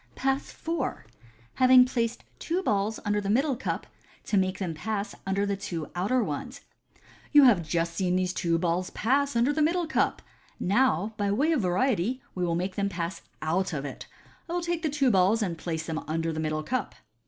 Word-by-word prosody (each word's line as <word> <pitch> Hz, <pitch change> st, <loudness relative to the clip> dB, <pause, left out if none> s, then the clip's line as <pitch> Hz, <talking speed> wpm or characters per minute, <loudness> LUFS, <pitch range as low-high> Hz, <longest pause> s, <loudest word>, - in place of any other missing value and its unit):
Pass 270 Hz, +1 st, -1 dB
IV. 325 Hz, -6 st, -3 dB, 0.5 s
Having 255 Hz, 0 st, +7 dB
placed 235 Hz, -2 st, -2 dB, 0.2 s
two 355 Hz, +3 st, -1 dB
Balls 210 Hz, -, 0 dB
under 205 Hz, 0 st, +1 dB
the 200 Hz, -, -3 dB
Middle 270 Hz, +6 st, +2 dB
Cup, 250 Hz, -, -3 dB, 0.4 s
to -, -, -1 dB
make 190 Hz, -1 st, +2 dB
them 180 Hz, -4 st, -3 dB
pass 200 Hz, +5 st, -3 dB
under 195 Hz, +1 st, +1 dB
the 200 Hz, 0 st, 0 dB
two 170 Hz, -6 st, -5 dB
Outer 210 Hz, +8 st, +1 dB
ones. 240 Hz, -, -5 dB, 0.3 s
— -, -, -26 dB
"You 290 Hz, -1 st, +9 dB
have 230 Hz, -9 st, +6 dB
just 165 Hz, +1 st, -1 dB
seen 180 Hz, +1 st, 0 dB
these 185 Hz, -1 st, 0 dB
two 170 Hz, -2 st, +1 dB
balls 175 Hz, +1 st, 0 dB
pass 275 Hz, +4 st, +1 dB
under 240 Hz, +5 st, +3 dB
the 310 Hz, -, 0 dB
middle 340 Hz, +3 st, +2 dB
cup 315 Hz, -, 0 dB
j -, -, -34 dB, 0.4 s
now, 205 Hz, -1 st, +2 dB
by 205 Hz, -1 st, 0 dB
way 280 Hz, +10 st, +2 dB
of 305 Hz, -7 st, +2 dB
variety, 215 Hz, +4 st, +1 dB
we 180 Hz, -, -2 dB
will 170 Hz, -1 st, +1 dB
make 185 Hz, +2 st, -2 dB
them 200 Hz, 0 st, +1 dB
pass 170 Hz, -1 st, -4 dB, 0.2 s
out 175 Hz, +4 st, 0 dB
of 140 Hz, -2 st, -3 dB
it. 140 Hz, -, -7 dB, 0.4 s
I -, -, -3 dB
will 350 Hz, -, 0 dB
take 345 Hz, -1 st, -2 dB
the 315 Hz, -, 0 dB
two 275 Hz, -3 st, +2 dB
balls, 200 Hz, +3 st, +3 dB
and 175 Hz, -4 st, -2 dB
place 160 Hz, -1 st, -4 dB
them 160 Hz, -1 st, -3 dB
under 165 Hz, +1 st, -1 dB
the 155 Hz, -, -4 dB
middle 155 Hz, 0 st, -1 dB
cup." 250 Hz, +3 st, -2 dB
200 Hz, 205 wpm, -27 LUFS, 175-255 Hz, 0.5 s, You